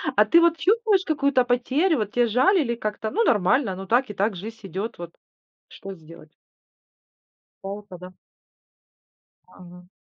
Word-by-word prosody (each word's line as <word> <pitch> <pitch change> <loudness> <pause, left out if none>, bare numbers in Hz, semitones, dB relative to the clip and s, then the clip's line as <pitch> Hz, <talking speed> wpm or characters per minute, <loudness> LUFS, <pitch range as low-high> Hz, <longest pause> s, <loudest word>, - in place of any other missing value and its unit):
А - - +5
ты 335 0 +5
вот 335 -1 +3
чувствуешь 405 +2 +1
какую-то 280 -5 +1
потерю? 270 +7 +1
Вот 210 -1 -3
те 245 -1 +2
жаль 260 - +3
или 235 -5 -1
как-то, 215 -1 -4
ну, 460 +3 +1
нормально, 210 - +1
ну, 195 +1 -8
так 245 +5 +1
и - - -6
так, 200 +1 -1
жизнь 220 +5 -8
идет, 195 +4 -5
вот 170 -1 -9 0.6
что 195 0 -10
сделать? 160 -2 -15 1.3
Жалко, 200 -1 -8
да? 180 +1 -12 1.3
Ага. 180 0 -15
225 Hz, 150 wpm, -23 LUFS, 190-285 Hz, 1.3 s, А